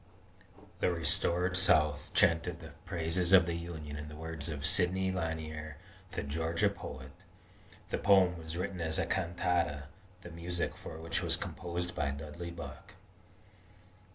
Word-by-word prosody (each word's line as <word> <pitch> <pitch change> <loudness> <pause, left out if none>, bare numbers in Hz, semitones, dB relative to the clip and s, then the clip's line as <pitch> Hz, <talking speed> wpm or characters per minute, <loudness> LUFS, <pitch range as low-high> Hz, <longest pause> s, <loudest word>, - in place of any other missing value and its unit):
"The - - +2
restored 85 +2 +3
South 75 -5 +3
chanted 85 +1 +3
the 80 -1 -10
praises 85 0 +1
of 95 -2 +9
the 85 - -2
Union 80 -3 -6
in 75 0 -6
the 75 - -9
words 80 -1 -4
of 75 -2 -3
Sidney 95 +4 +2
Lanier, 80 -3 -4 0.4
the - - -2
Georgia 80 +3 +1
poet." 65 0 -8 0.8
The - - 0
poem 95 -3 +5
was 80 0 -6
written 90 0 -3
as 80 -1 0
a - - +1
cantata, 85 -4 0 0.4
the 90 - -9
music 85 +1 -3
for 80 - -8
which 80 +1 -1
was - - +3
composed 90 0 -4
by 70 - 0
Dudley 75 +5 -6
Buck. 85 0 -9
85 Hz, 145 wpm, -32 LUFS, 80-90 Hz, 0.8 s, of